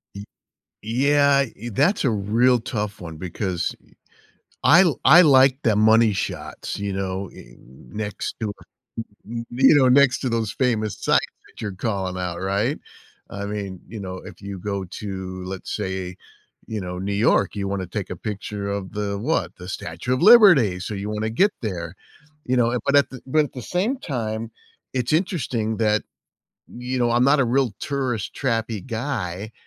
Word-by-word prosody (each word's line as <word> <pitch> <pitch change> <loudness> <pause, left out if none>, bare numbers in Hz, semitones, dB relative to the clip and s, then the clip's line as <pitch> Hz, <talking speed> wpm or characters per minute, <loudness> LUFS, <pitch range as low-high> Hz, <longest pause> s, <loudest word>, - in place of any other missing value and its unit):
Y 100 - -7 0.6
Yeah. 140 +4 +3
E 120 +4 -7
that's 145 - +2
a - - +4
real 115 +4 +2
tough 105 -3 -4
one 80 -2 -8
because 90 +1 -3
e - - -25 0.7
I 170 +5 +7 0.2
I 165 +7 +9
like 135 -4 +6
the 110 -3 +3
money 110 +1 +5
shots, 100 - -5
you 100 -1 -3
know, 95 0 -3
eh, - - -13
next 65 - -6
to 110 - -2 0.8
y 115 +1 -5
you 130 +4 +5
know, 130 -2 +5
next 135 0 +5
to 130 - -1
those 115 -2 -1
famous 110 -5 0
sites - - +2 0.2
that - - -15
you're 105 -3 -4
calling 95 -2 -3
out, 90 -1 -4
right? 100 +9 0 0.5
I 100 +1 -5
mean, 100 -3 -5
you 110 +2 -7
know, 95 -1 -6
if - - -12
you 100 -1 -6
go 100 0 -3
to, 95 -1 -6
let's 95 0 -6
say, 95 -1 -4 0.5
you 110 -1 -4
know, 90 -1 -5
New 100 +2 -3
York, 105 +4 +2
you 100 -1 -2
wanna 95 -1 -3
take 95 +2 -5
a 90 - -4
picture 105 0 -5
of 100 -2 -4
the, 100 -1 -2
what, 145 +11 -1
the 90 0 -10
Statue 90 +5 -4
Of 130 - -2
Liberty, 175 - +7
so 100 +4 -4
you 100 +1 -4
wanna 110 +1 -2
get 195 - +3
there. 90 -5 -4 0.5
You 130 - +1
know? 120 0 +2
But 140 - +4
at 140 - +4
the 130 - -9
but 155 +3 +3
at - - -16
the 125 - -6
same 200 - -1
time, 115 - -4 0.4
it's 125 +1 -1
interesting 130 - 0
that, 105 -1 +2 0.7
you 125 +1 -4
know, 120 -1 +2
I'm 120 +1 +3
not 140 +2 +4
a - - +4
real 125 -1 +1
tourist 130 -7 -2
trappy 115 -5 -2
guy 110 -5 -4
110 Hz, 175 wpm, -23 LUFS, 95-130 Hz, 0.8 s, I